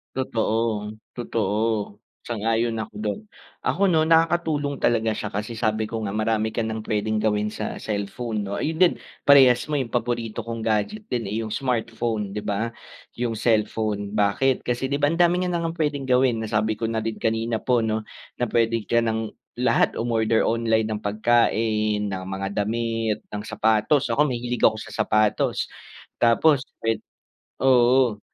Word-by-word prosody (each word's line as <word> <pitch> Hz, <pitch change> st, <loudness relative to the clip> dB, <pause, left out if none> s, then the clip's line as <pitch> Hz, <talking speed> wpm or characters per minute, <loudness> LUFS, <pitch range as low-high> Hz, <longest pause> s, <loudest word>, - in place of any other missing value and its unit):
Totoo. 110 Hz, -4 st, -1 dB, 0.2 s
Totoo. 110 Hz, -2 st, -1 dB, 0.3 s
Sang-ayon 115 Hz, 0 st, 0 dB
ako 110 Hz, -1 st, -5 dB
do'n. 105 Hz, -, -2 dB, 0.4 s
Ako 200 Hz, +1 st, +2 dB
'no, 160 Hz, -4 st, +3 dB
nakakatulong 160 Hz, -3 st, +2 dB
talaga 110 Hz, -2 st, +2 dB
siya, 105 Hz, -, -4 dB
kasi 105 Hz, +3 st, -4 dB
sabi 110 Hz, -1 st, 0 dB
ko 110 Hz, 0 st, -4 dB
nga, 100 Hz, -, -2 dB
marami 110 Hz, +1 st, 0 dB
ka -, -, -3 dB
nang 110 Hz, -1 st, -2 dB
pwedeng 110 Hz, 0 st, -1 dB
gawin 105 Hz, -1 st, +1 dB
sa 105 Hz, -, -5 dB
cellphone, 105 Hz, +1 st, -3 dB
'no? 100 Hz, 0 st, -4 dB
Ayun 160 Hz, +2 st, -1 dB
din, 180 Hz, -2 st, +6 dB, 0.3 s
parehas 135 Hz, -4 st, +6 dB
mo, 145 Hz, -, +1 dB
yung 130 Hz, -, -2 dB
paborito 115 Hz, -2 st, -2 dB
kong 115 Hz, 0 st, -5 dB
gadget 110 Hz, -, -1 dB
din, 120 Hz, -, -2 dB
eh, 105 Hz, +3 st, -2 dB
yung 110 Hz, -, -6 dB
smartphone, 115 Hz, -5 st, -2 dB
di 105 Hz, -, -3 dB
ba? 105 Hz, +3 st, -1 dB, 0.5 s
Yung 120 Hz, -2 st, -2 dB
cellphone. 105 Hz, -2 st, 0 dB
Bakit? 105 Hz, +6 st, +2 dB
Kasi 125 Hz, +2 st, -1 dB
di 140 Hz, -, 0 dB
ba, 145 Hz, -, +3 dB
ang 160 Hz, -, 0 dB
dami 175 Hz, 0 st, +4 dB
niya 180 Hz, -1 st, -1 dB
na 170 Hz, -, -1 dB
ngang 165 Hz, 0 st, -2 dB
pwedeng 145 Hz, -3 st, 0 dB
gawin. 125 Hz, -3 st, +2 dB
Nasabi 110 Hz, 0 st, 0 dB
ko -, -, -8 dB
na 115 Hz, -, 0 dB
din 110 Hz, 0 st, -3 dB
kanina 115 Hz, 0 st, -1 dB
po 125 Hz, -2 st, +3 dB
'no, 110 Hz, -1 st, -1 dB, 0.3 s
na -, -, -3 dB
pwedeng 115 Hz, -1 st, +1 dB
ka 115 Hz, +4 st, +2 dB
nang 110 Hz, -1 st, -1 dB, 0.2 s
lahat, -, -, +2 dB
umorder 115 Hz, -1 st, +1 dB
online 115 Hz, -1 st, +1 dB
ng 110 Hz, -1 st, -3 dB
pagkain, 110 Hz, -1 st, +1 dB
ng 95 Hz, -1 st, -4 dB
mga 95 Hz, 0 st, -3 dB
damit, 115 Hz, 0 st, -1 dB
ng 105 Hz, 0 st, -4 dB
sapatos. 110 Hz, +5 st, +2 dB
Ako, 150 Hz, +6 st, +3 dB
mahilig 120 Hz, -2 st, -3 dB
ako -, -, +5 dB
sa 110 Hz, -, -8 dB
sapatos. 110 Hz, -1 st, +1 dB, 0.5 s
Tapos 130 Hz, +5 st, +4 dB, 0.2 s
pwed 115 Hz, -1 st, +1 dB, 0.6 s
oo. 125 Hz, -3 st, +4 dB
115 Hz, 165 wpm, -24 LUFS, 110-125 Hz, 0.6 s, din